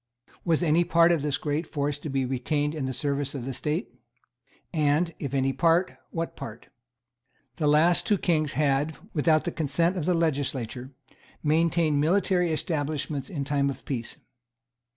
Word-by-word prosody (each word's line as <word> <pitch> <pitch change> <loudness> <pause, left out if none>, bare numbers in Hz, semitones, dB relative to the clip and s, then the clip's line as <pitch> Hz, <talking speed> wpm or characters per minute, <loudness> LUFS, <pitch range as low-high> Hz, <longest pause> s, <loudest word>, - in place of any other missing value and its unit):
Was 165 0 +1
any 165 +1 +4
part 170 0 +4
of 165 -4 +2
this 145 -1 0
great 155 +2 -2
force 145 0 -2
to 150 - -6
be 135 -1 0
retained 145 +4 -1
in 145 -4 -3
the - - -2
service 140 +1 -2
of 125 -3 -5
the 135 - -3
State? 155 - -2 0.8
And, 155 +2 +2
if 140 -1 -3
any 135 0 +1
part, 165 +5 +2
what 165 -1 -4
part? 110 - -9 0.9
The 150 - +1
last 155 +4 +4
two 205 - +3
kings 155 -6 +1
had, 145 +2 +1 0.2
without 155 0 +3
the 175 - -2
consent 165 +4 +1
of 160 - -2
the 180 0 +2
legislature, 135 -6 -1 0.5
maintained 160 -1 +2
military 180 +1 +2
establishments 150 -3 -2
in 150 -7 -3
time 140 0 +1
of 135 -1 -7
peace. 120 -5 -4
150 Hz, 160 wpm, -27 LUFS, 140-165 Hz, 0.9 s, any